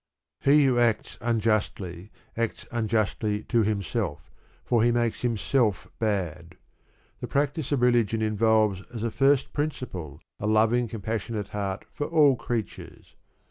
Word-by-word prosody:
He 145 +1 +5
who 125 -2 +3
acts 115 -3 0
unjustly 110 -5 -1 0.3
acts 115 -1 -2
unjustly 110 -2 0
to 120 -2 +1
himself, 100 - -2 0.3
for 120 -2 +2
he 120 +1 +4
makes 120 -1 0
himself 115 -2 0
bad. 90 -6 -2 0.6
The - - -5
practice 145 0 -1
of 135 -4 +1
religion 120 -3 +3
involves 110 -2 +2
as 115 -2 -5
a 115 - -1
first 135 +1 +2
principle 95 - -4 0.2
a 105 - -2
loving 110 +3 +3
compassionate 110 0 -4
heart 100 -1 -4
for 145 - -3
all 150 -5 +5
creatures. 115 -3 -6
110 Hz, 130 wpm, -26 LUFS, 105-120 Hz, 0.6 s, He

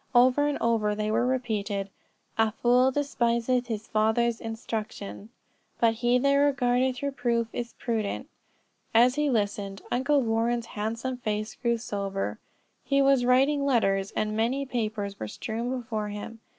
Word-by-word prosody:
Over 255 +4 +5
and 295 - 0
over 220 -3 +1
they 215 0 -1
were 235 +3 +2
repeated: 210 -6 -2 0.4
"A 225 -1 +3
fool 245 +3 +4
despiseth 250 -3 0
his 220 -2 -4
father's 220 +2 +1
instruction: 220 -2 -5 0.5
but 230 -1 +4
he 240 +2 +2
that 280 +2 +3
regardeth 260 -2 +2
reproof 240 -4 0
is 240 -1 -4
prudent." 230 +2 -3 0.7
As 245 +2 +6
he 295 +1 +1
listened 205 -4 -1
Uncle 270 +3 +2
Warren's 230 +1 0
handsome 230 +4 -3
face 215 -2 -3
grew 235 -1 0
sober, 200 -4 -3 0.4
he 275 0 +2
was 275 -2 +4
writing 270 +3 +3
letters, 195 -8 +2
and 215 0 -1
many 245 +5 0
papers 215 -5 -3
were 110 - -4
strewn 225 - -4
before 230 -4 -3
him. 210 +2 -7
235 Hz, 140 wpm, -27 LUFS, 215-255 Hz, 0.7 s, As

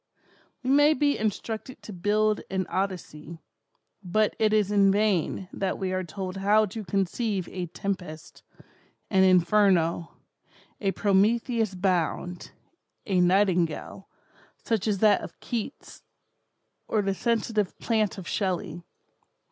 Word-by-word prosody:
We 255 - 0
may 290 +2 +5
be 285 +2 +2
instructed 220 +4 -4
to 210 - -8
build 210 +4 +1
an 190 -1 -1
Odyssey, 170 -4 -4 0.7
but 210 +4 +1
it 215 -1 +3
is 210 -2 +2
in 200 -1 +4
vain 195 -3 0
that 195 -1 -2
we 185 -1 -2
are 185 0 -1
told 185 +2 -6
how 210 +3 +3
to 215 +2 -7
conceive 195 0 -1
a 180 -1 -5
'Tempest,' 175 -3 -6 0.7
an 190 -2 +4
'Inferno,' 180 -2 +3 0.7
a 195 -2 0
'Prometheus 215 +2 +1
Bound,' 180 -1 -1 0.6
a 190 -3 +1
'Nightingale,' 180 -1 +1 0.5
such 225 -2 -2
as 205 -2 +1
that 210 -1 +5
of - - -10
Keats, 240 +3 -6 0.9
or 215 -2 +1
the 195 0 0
'Sensitive 220 -2 -1
Plant' 220 -4 0
of 185 - -8
Shelley. 180 -3 -2
195 Hz, 125 wpm, -26 LUFS, 185-215 Hz, 0.9 s, may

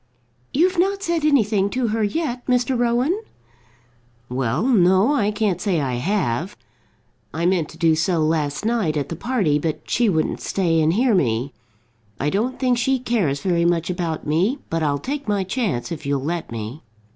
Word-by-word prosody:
"You've 355 +4 +2
not 395 +2 +1
said 340 -4 0
anything 215 -9 +3
to 250 +1 -1
her 220 0 0
yet, 245 +2 -2
Mr. 250 +1 +2
Rowan?" 245 - +1 1.1
"Well, 125 - -1
no; 195 0 +4
I 210 -8 +2
can't 210 -4 -1
say 195 -6 +1
I 130 -4 -1
have. 170 - -1 0.8
I 165 +1 -1
meant 175 -4 +1
to 160 - -13
do 165 -1 +3
so 170 +3 +1
last 155 +2 -1
night 215 -10 0
at 140 -2 -2
the 165 - -4
party, 190 - 0
but 155 0 -3
she 235 -2 +2
wouldn't 160 -4 0
stay 165 -4 +1
and 155 +1 +3
hear 240 +4 +2
me. 130 - 0 0.7
I 145 +2 0
don't 235 +6 -1
think 250 -2 +1
she 265 +2 +2
cares 210 - -1
very 175 -3 +1
much 170 0 +1
about 170 -3 -3
me, 175 - +1
but 165 0 0
I'll 145 -2 +1
take 280 - -5
my 205 -2 +1
chance 185 - -2
if 155 -2 -5
you'll 140 -2 -1
let 165 -1 -3
me." 115 +5 -6
190 Hz, 180 wpm, -22 LUFS, 155-240 Hz, 1.1 s, no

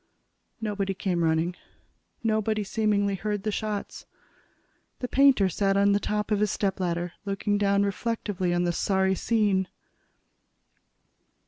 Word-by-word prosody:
Nobody 200 -3 -2
came 180 -3 -1
running. 165 +2 +1 0.7
Nobody, 215 -1 +1
seemingly, 205 -1 +1
heard 205 +1 -3
the 215 - -1
shots. 210 -1 -4 0.9
The 250 - -4
painter 270 -7 +5
sat 195 +2 +1
on 200 0 +4
the 200 - +3
top 210 +1 -2
of 210 - +2
his 210 0 +2
stepladder, 180 -3 -1
looking 205 +1 -1
down 200 0 +3
reflectively 200 -2 -2
on 175 0 +1
the 175 - +1
sorry 190 +1 +1
scene. 200 -2 +1
200 Hz, 125 wpm, -26 LUFS, 190-210 Hz, 0.9 s, painter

